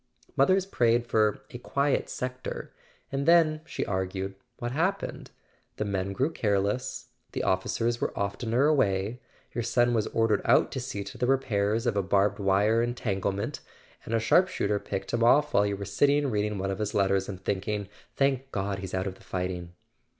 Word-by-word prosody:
Mothers 185 +7 +4
prayed 120 -9 +2
for 110 -2 +1
"a 120 - -7
quiet 140 +2 0
sector"—and 130 +2 -6
then, 160 -2 +5
she - - -3
argued, 95 0 -2 0.2
what 120 0 -4
happened? 180 +8 -2 0.5
The 105 - -2
men 100 -1 -2
grew 135 +10 0
careless, 105 +2 -1 0.2
the - - -2
officers 115 +5 0
were - - 0
oftener 110 +6 0
away; 110 -6 +1 0.3
your 120 - -2
son 120 +1 +2
was 110 -2 +1
ordered 115 -2 +1
out - - +4
to 130 - -3
see 125 -5 -4
to 100 +3 -10
the 125 - +1
repairs 115 -4 +1
of 120 -4 +1
a 100 - +2
barbed 100 +2 +2
wire 100 +3 +3
entanglement, 100 -5 -2 0.4
and 115 - -2
a - - +4
sharp¬ 145 +11 +4
shooter 105 - -1
picked 95 -1 -5
him 120 0 +2
off 145 +5 +4
while 100 +1 +4
you 100 -1 -2
were 100 - -5
sitting 145 +6 +2
reading 105 -1 0
one 95 +1 -2
of 95 - -4
his 105 -1 -2
letters, 95 -1 +2
and 95 -1 -8
thinking: 100 +1 -1 0.3
Thank 135 -1 +1
God 100 0 -2
he's 95 0 -5
out 95 0 -1
of 95 - -3
the 95 - -19
fighting." 90 -1 -4
105 Hz, 180 wpm, -28 LUFS, 100-125 Hz, 0.5 s, then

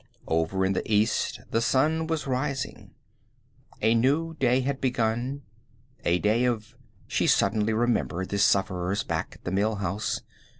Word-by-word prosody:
Over 80 +4 +1
in 95 - +1
the 95 - -3
east 105 +1 +1
the 115 - +2
sun 155 +7 +2
was 160 -2 -2
rising. 135 0 -3 0.9
A 110 +1 +5
new 145 +8 +2
day 125 0 +3
had 135 +1 -2
begun, 125 +2 -1 0.6
a 85 +1 +3
day 110 +6 +2
of 115 -4 -2 0.3
She - - 0
suddenly 110 0 +2
remembered 110 -5 0
the 100 - -1
sufferers 95 0 +2
back - - -3
at - - -20
the 90 - -3
Mill 105 +3 +1
House. 105 +2 -2
110 Hz, 145 wpm, -27 LUFS, 100-130 Hz, 0.9 s, A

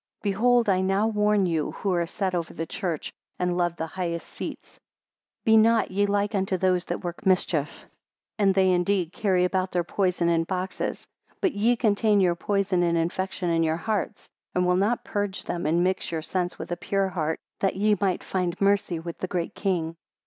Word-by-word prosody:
102 200 -2 +1
Behold 240 +2 +3
I 185 -2 +3
now 195 +3 +2
warn 210 -2 +2
you 160 -4 -1
who 195 -2 -1
are 170 -1 0
set 190 +1 -2
over 170 -2 -3
the 165 - -3
church, 165 -2 -4 0.2
and 180 -1 0
love 175 -1 0
the 160 - -3
highest 170 0 -4
seats, - - -8 0.7
be 220 - +6
not 225 -1 +4
ye 205 +2 +2
like 205 +1 0
unto 190 -1 0
those 180 -1 +1
that - - -4
work 175 -1 -5
mischief. 180 -6 +2
103 - - -18 0.5
And 195 -2 +3
they 190 -1 +4
indeed 180 -1 +1
carry 185 -4 +2
about 185 0 0
their 175 -1 +1
poison 180 -1 0
in 165 -1 +3
boxes, 185 +1 -3 0.3
but 380 - +1
ye 225 +4 +2
contain 215 -2 +2
your 180 -3 +4
poison 195 0 0
and 170 -1 +2
infection 175 +1 -1
in 165 0 +2
your 160 0 +1
hearts, 210 +1 -3 0.3
and 180 0 +2
will 180 0 +3
not 205 +6 +1
purge 205 -2 -2
them, 170 -3 -3
and 170 +3 +2
mix 185 -1 -1
your 160 -2 -3
sense 180 0 -2
with - - -7
a 175 - -1
pure 195 +1 0
heart, 160 -3 -2 0.2
that 195 - +1
ye 210 +2 +3
might 190 -3 0
find 180 -2 -2
mercy 200 -3 +2
with 165 +1 -7
the 185 - -2
Great 180 0 -2
King. 170 -5 -1
185 Hz, 200 wpm, -26 LUFS, 175-200 Hz, 0.7 s, be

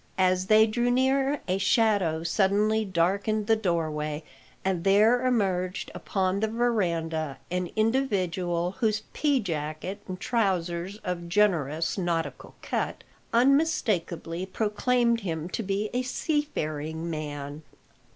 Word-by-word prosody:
As 185 0 +2
they 215 +1 +7
drew 240 +2 0
near 265 +3 +2
a 185 +1 0
shadow 195 -6 +2
suddenly 205 +5 +2
darkened 200 +3 0
the 225 +1 +4
doorway, 155 -6 -1 0.4
and 185 -3 0
there 215 +6 +4
emerged 190 -6 0
upon 190 0 -1
the 220 - +1
verandah 170 - -1
an 180 -1 -1
individual 185 -7 0
whose 215 -3 +1
pea 290 -3 +2
jacket 165 +1 -4
and 185 -1 -5
trousers 190 -4 -1
of 175 -2 -4
generous 170 -4 +1
nautical 170 -2 -3
cut - - -2 0.3
unmistakably 230 - +1
proclaimed 235 +4 +1
him 165 -6 -3
to 230 - -3
be 200 +1 -2
a 250 - +1
seafaring 165 - -2
man. 145 -1 -5
190 Hz, 115 wpm, -27 LUFS, 170-220 Hz, 0.4 s, they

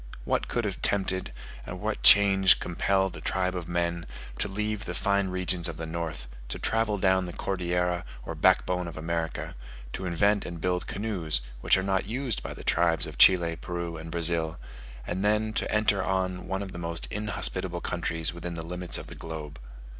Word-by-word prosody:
What - - 0
could 120 -2 -1
have 100 -3 -4
tempted, 95 -2 +1 0.4
or - - -5
what - - -3
change 95 -1 +7
compelled 95 +2 0
a - - -9
tribe 95 0 -1
of 90 -2 -4
men, 85 0 -1 0.3
to - - +1
leave 105 +1 -3
the - - -4
fine 100 -2 +1
regions 90 -1 +2
of 85 -3 -5
the 80 - -4
north, 80 -6 -5 0.2
to - - -3
travel 110 -2 +1
down 95 -1 +3
the 90 - -6
Cordillera 90 -1 -1 0.2
or 80 - -4
backbone 90 +2 +2
of 85 - -8
America, 80 -2 -3 0.4
to 95 - -4
invent 100 +4 +2
and 85 -1 -6
build 90 +1 -1
canoes, 90 - -1 0.2
which - - +5
are 95 - -1
not 95 0 0
used 125 0 -2
by - - -6
the - - -9
tribes 85 -2 +2
of - - -9
Chile, 85 -3 +6
Peru, 85 -1 -4
and 80 +1 -7
Brazil, 85 -1 +1 0.5
and 95 +2 -3
then 105 +1 +1
to - - -1
enter 105 -3 +2
on 95 -1 -1
one 95 +1 -2
of 95 - -7
the 85 - -7
most 85 -1 -3
inhospitable 95 -4 -1
countries 85 -2 -1
within 85 0 -5
the 80 -1 -4
limits 90 +1 0
of - - -7
the - - -9
globe? 75 -4 -7
90 Hz, 190 wpm, -28 LUFS, 85-95 Hz, 0.5 s, change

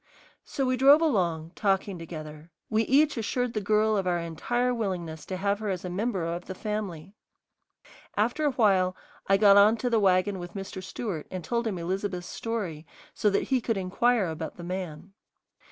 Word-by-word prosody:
So 270 - -2
we 255 0 +1
drove 275 +4 +7
along, 175 - 0
talking 195 -2 0
together; 155 -1 -8 0.2
we 220 +1 +3
each 290 +2 +4
assured 245 +2 -1
the 215 - -1
girl 215 +1 +2
of 195 -2 0
our 175 -1 +2
entire 240 +10 -1
willingness 180 -8 -4
to 185 - -3
have 200 +2 0
her 215 -1 -3
as 185 -2 -3
a 180 - -4
member 195 -2 -1
of 170 +1 -4
the 190 - -6
family. 195 -4 -4 1.0
After 240 +9 +1
a 290 - +3
while 190 -6 +3 0.3
I 195 - +5
got 200 -1 +7
on 210 +3 +6
to 245 +2 -2
the 225 - +4
wagon 190 0 +2
with 175 +1 -8
Mr. 195 -1 -6
Stewart 185 -3 -5
and 185 -2 -5
told 235 +3 -1
him 200 -4 -2
Elizabeth's 180 +1 -3
story 185 -9 -4 0.3
so 210 - +2
that 200 - +1
he 260 -2 +2
could 225 -2 -1
inquire 200 +4 +2
about 160 -1 -5
the 175 - -9
man. 180 0 -6
195 Hz, 185 wpm, -27 LUFS, 175-225 Hz, 1.0 s, drove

